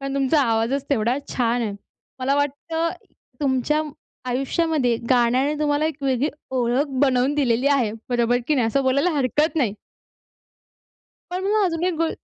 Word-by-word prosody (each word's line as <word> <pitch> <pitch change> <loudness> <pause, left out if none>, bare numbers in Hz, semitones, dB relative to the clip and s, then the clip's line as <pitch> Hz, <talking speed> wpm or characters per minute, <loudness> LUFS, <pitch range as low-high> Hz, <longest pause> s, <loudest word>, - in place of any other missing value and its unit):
पण 275 0 -4
तुमचा 275 +2 +2
आवाजच 235 +3 0
तेवढा 240 0 +1
छान 240 -1 0
आहे. 210 -3 -2 0.5
मला 265 +2 +1
वाटतं 320 +4 -1 0.5
तुमच्या 280 +3 +1 0.5
आयुष्यामध्ये 270 -1 0
गाण्याने 255 +4 +3
तुम्हाला 295 0 +1
एक 305 -2 -5
वेगळी 270 +2 +1 0.2
ओळख 255 +2 +1 0.2
बनवून 265 +1 +2
दिलेली 255 -2 +1
आहे. 250 -7 +2 0.2
बरोबर 240 0 +2
की 305 - +3
नाही? 245 -4 +2
असं 275 +4 +1
बोलायला 280 +7 +2
हरकत 295 +3 0
नाही. 230 -9 +1 1.6
पण 365 +1 -3
मग 430 -2 +3
अजून 335 -1 -1
एक 365 - 0
गो 330 -1 +1
275 Hz, 145 wpm, -22 LUFS, 245-300 Hz, 1.6 s, गाण्याने